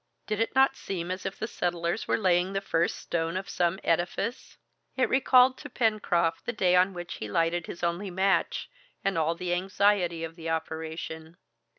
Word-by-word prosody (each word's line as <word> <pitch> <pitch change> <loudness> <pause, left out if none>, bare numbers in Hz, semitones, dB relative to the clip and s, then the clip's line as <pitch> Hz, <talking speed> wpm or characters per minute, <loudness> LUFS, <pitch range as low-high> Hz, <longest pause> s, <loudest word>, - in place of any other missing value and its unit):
Did 215 -1 -2
it 225 +3 0
not 270 0 +5
seem 180 -2 -4
as 185 +1 -3
if 195 - -6
the 220 - -3
settlers 175 0 -2
were - - +2
laying 185 -2 +2
the 195 - +1
first 170 -3 0
stone 165 +1 -2
of 190 - -5
some 175 +1 0
edifice? 180 +8 -1 0.4
It 260 - +3
recalled 260 -1 +5
to - - -8
Pencroft 205 -8 +1
the 245 - -1
day 185 -4 +3
on 185 +1 +3
which 175 0 -6
he 110 - -5
lighted 165 +7 0
his 170 - -8
only 175 +4 -1
match, 190 +2 +1 0.4
and 195 -1 +1
all 165 +1 +1
the 175 +1 -2
anxiety 185 -2 +1
of 165 0 -6
the 165 -1 -6
operation. 160 0 -4
180 Hz, 185 wpm, -28 LUFS, 165-195 Hz, 0.4 s, not